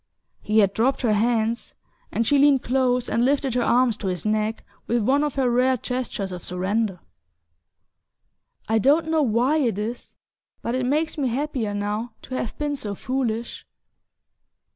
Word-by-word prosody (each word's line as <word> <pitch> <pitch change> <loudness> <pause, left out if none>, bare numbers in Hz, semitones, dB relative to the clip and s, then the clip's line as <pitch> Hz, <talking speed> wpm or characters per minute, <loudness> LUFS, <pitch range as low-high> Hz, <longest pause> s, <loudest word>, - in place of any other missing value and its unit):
He 215 +1 0
had 200 -1 +2
dropped 260 +4 +1
her 225 -3 +3
hands, 225 +1 0 0.4
and 230 - 0
she 285 +2 +3
leaned 280 -2 +5
close 250 -1 +1
and 235 - +1
lifted 270 -1 +1
her 250 - +1
arms 240 -1 +3
to 200 - -4
his 180 0 -3
neck 215 +1 -1 0.2
with 235 -1 +1
one 275 +6 +3
of 295 -2 -2
her 265 -2 +1
rare 250 +2 +3
gestures 245 -6 -4
of 180 -1 -7
surrender. 190 +1 -1 1.7
"I 220 +1 +2
don't 305 +7 +3
know 320 -1 +2
why 250 +4 +2
it 240 -10 +1
is; 225 +4 -5 0.5
but 235 - -2
it 255 -1 0
makes 305 +3 0
me 270 - +1
happier 245 -4 -2
now 210 +3 -3
to 260 - -9
have 245 -3 -3
been 295 -1 -1
so 210 -7 -5
foolish!" 235 -1 -3
240 Hz, 165 wpm, -24 LUFS, 215-265 Hz, 1.7 s, leaned